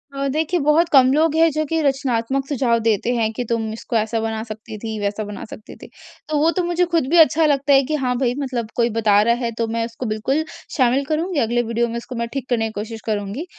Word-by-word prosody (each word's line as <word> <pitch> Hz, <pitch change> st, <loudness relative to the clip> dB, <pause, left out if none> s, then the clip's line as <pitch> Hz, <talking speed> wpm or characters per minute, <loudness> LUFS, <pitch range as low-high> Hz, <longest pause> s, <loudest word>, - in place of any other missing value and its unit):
अ, 275 Hz, 0 st, -1 dB
देखिए 320 Hz, +3 st, 0 dB
बहुत 325 Hz, +3 st, +3 dB
कम 260 Hz, -1 st, +6 dB
लोग 315 Hz, +1 st, +2 dB
हैं 330 Hz, 0 st, +5 dB
जो 310 Hz, +1 st, -1 dB
कि 325 Hz, +2 st, -1 dB
रचनात्मक 270 Hz, -1 st, 0 dB
सुझाव 245 Hz, -5 st, +1 dB
देते 225 Hz, +1 st, +1 dB
हैं 220 Hz, -1 st, 0 dB
कि 245 Hz, -, -3 dB
तुम 225 Hz, -2 st, -1 dB
इसको 225 Hz, +1 st, -6 dB
ऐसा 220 Hz, +1 st, -1 dB
बना 225 Hz, 0 st, -3 dB
सकती 220 Hz, 0 st, -8 dB
थी, 220 Hz, 0 st, -5 dB
वैसा 205 Hz, +1 st, -2 dB
बना 205 Hz, -1 st, -7 dB
सकती 215 Hz, -, -11 dB
थी। -, -, -13 dB, 0.4 s
तो 305 Hz, -, 0 dB
वो 320 Hz, -, +4 dB
तो 365 Hz, -, +2 dB
मुझे 350 Hz, +1 st, +1 dB
ख़ुद 330 Hz, -6 st, +1 dB
भी 345 Hz, -, +3 dB
अच्छा 320 Hz, +1 st, +1 dB
लगता 285 Hz, -1 st, +2 dB
है 270 Hz, 0 st, +6 dB
कि -, -, +2 dB
हाँ 250 Hz, 0 st, 0 dB
भाई 245 Hz, -2 st, +1 dB
मतलब 250 Hz, -5 st, -3 dB
कोई 235 Hz, 0 st, +2 dB
बता 210 Hz, -2 st, +4 dB
रहा 235 Hz, +2 st, +3 dB
है 230 Hz, -, -1 dB
तो 230 Hz, -, 0 dB
मैं 230 Hz, 0 st, 0 dB
उसको 230 Hz, +2 st, -7 dB
बिल्कुल 230 Hz, +8 st, -1 dB, 0.3 s
शामिल 260 Hz, +2 st, +2 dB
करूँगी 315 Hz, +2 st, -1 dB
अगले 240 Hz, +1 st, +1 dB
वीडियो 235 Hz, +1 st, 0 dB
में 235 Hz, -, -4 dB
उसको 245 Hz, +1 st, -7 dB
मैं 235 Hz, 0 st, -2 dB
ठीक 270 Hz, -2 st, -5 dB
करने 225 Hz, -2 st, +1 dB
की 220 Hz, -, -7 dB
कोशिश 225 Hz, 0 st, -7 dB
करुँगी। 210 Hz, -, -3 dB
245 Hz, 245 wpm, -20 LUFS, 225-290 Hz, 0.4 s, कम